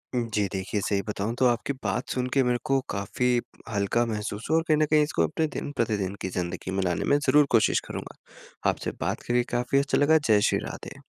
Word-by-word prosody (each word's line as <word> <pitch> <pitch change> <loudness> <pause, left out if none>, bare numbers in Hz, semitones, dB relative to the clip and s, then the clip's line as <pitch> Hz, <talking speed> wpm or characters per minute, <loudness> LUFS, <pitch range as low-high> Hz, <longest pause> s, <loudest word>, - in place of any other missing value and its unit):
उम, 120 -1 0
जी 105 -2 +2
देखिए 95 +1 -2
सही 100 0 0
बताऊँ 105 +2 -2
तो 130 - +4
आपकी 120 +3 +1
बात 125 - -2
सुन 125 0 -1
के 135 -1 +4
मेरे 125 0 +1
को 135 0 +2
काफ़ी 100 +5 -1 0.4
हल्का 105 +3 +1
महसूस 105 -1 -4
हुआ 160 - +4
और 165 - +2
कहीं 155 - +4
न 155 - +3
कहीं 155 -1 +6
इसको 145 - 0
अपने 155 - 0
दिन-प्रतिदिन 105 -8 -2
की 95 - -2
ज़िंदगी 90 +1 -3
में 95 0 0
लाने 90 -2 0
में 145 - +5
ज़रूर 145 +2 +6
कोशिश 110 - +4
करूँगा। - - -7 0.5
आपसे - - -2
बात - - -1
करके 120 0 +2
काफ़ी 125 +3 +2
अच्छा 140 +1 +1
लगा। 155 +2 +5
जय 105 -2 +5
श्री - - +1
राधे। - - -9
115 Hz, 215 wpm, -26 LUFS, 100-135 Hz, 0.5 s, कहीं